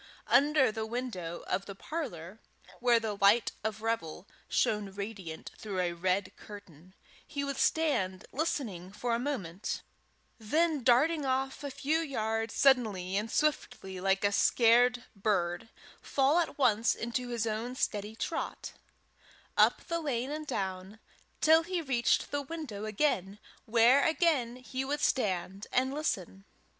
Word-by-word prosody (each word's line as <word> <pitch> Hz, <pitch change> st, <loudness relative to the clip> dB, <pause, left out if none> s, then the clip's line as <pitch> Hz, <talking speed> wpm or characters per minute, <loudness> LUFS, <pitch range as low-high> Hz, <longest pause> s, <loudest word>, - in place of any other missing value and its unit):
Under 285 Hz, -3 st, +5 dB
the 220 Hz, 0 st, -4 dB
window 220 Hz, -8 st, -4 dB
of 195 Hz, +1 st, -2 dB
the 200 Hz, -, -7 dB
parlour 195 Hz, -, -6 dB, 0.4 s
where 240 Hz, -1 st, +4 dB
the 220 Hz, -2 st, -3 dB
light 200 Hz, +3 st, +4 dB
of 220 Hz, 0 st, -3 dB
revel 205 Hz, -5 st, -3 dB, 0.2 s
shone 210 Hz, -2 st, +1 dB
radiant 195 Hz, -5 st, -7 dB
through 200 Hz, -3 st, -4 dB
a 175 Hz, -1 st, 0 dB
red 185 Hz, +2 st, -1 dB
curtain, 185 Hz, -3 st, -13 dB, 0.3 s
he 280 Hz, -1 st, -3 dB
would 280 Hz, -1 st, -3 dB
stand 195 Hz, -13 st, +1 dB
listening 225 Hz, -, -3 dB
for 235 Hz, +4 st, -2 dB
a 230 Hz, -, +1 dB
moment, 205 Hz, -, -3 dB, 0.6 s
then, 305 Hz, +7 st, +1 dB
darting 285 Hz, +6 st, +4 dB
off 265 Hz, +1 st, -1 dB
a 285 Hz, -, -3 dB
few 295 Hz, +4 st, 0 dB
yards 225 Hz, -7 st, -2 dB
suddenly 215 Hz, -9 st, +3 dB
and 210 Hz, +3 st, -1 dB
swiftly 205 Hz, -10 st, -1 dB
like 195 Hz, +1 st, +1 dB
a 205 Hz, -, +3 dB
scared 245 Hz, +3 st, +4 dB
bird, 195 Hz, 0 st, -1 dB, 0.3 s
fall 280 Hz, +4 st, +2 dB
at 335 Hz, -, -2 dB
once 230 Hz, -5 st, +3 dB
into 235 Hz, +2 st, -3 dB
his 235 Hz, -2 st, -2 dB
own 225 Hz, +3 st, -3 dB
steady 210 Hz, -3 st, -2 dB
trot 325 Hz, -, -4 dB, 0.8 s
up -, -, +4 dB
the 335 Hz, -1 st, -2 dB
lane 270 Hz, -4 st, -2 dB
and 305 Hz, 0 st, -5 dB
down, 190 Hz, -3 st, -4 dB, 0.4 s
till 320 Hz, +1 st, +6 dB
he 355 Hz, +2 st, -2 dB
reached 250 Hz, -7 st, +1 dB
the 285 Hz, -, -1 dB
window 275 Hz, -9 st, -6 dB
again, 210 Hz, -4 st, 0 dB, 0.3 s
where 240 Hz, +5 st, +5 dB
again 315 Hz, -8 st, +2 dB
he 255 Hz, +1 st, -5 dB
would 290 Hz, +2 st, -2 dB
stand 195 Hz, -4 st, 0 dB
and 260 Hz, +1 st, +1 dB
listen. 195 Hz, -, -3 dB
230 Hz, 140 wpm, -31 LUFS, 195-275 Hz, 0.8 s, till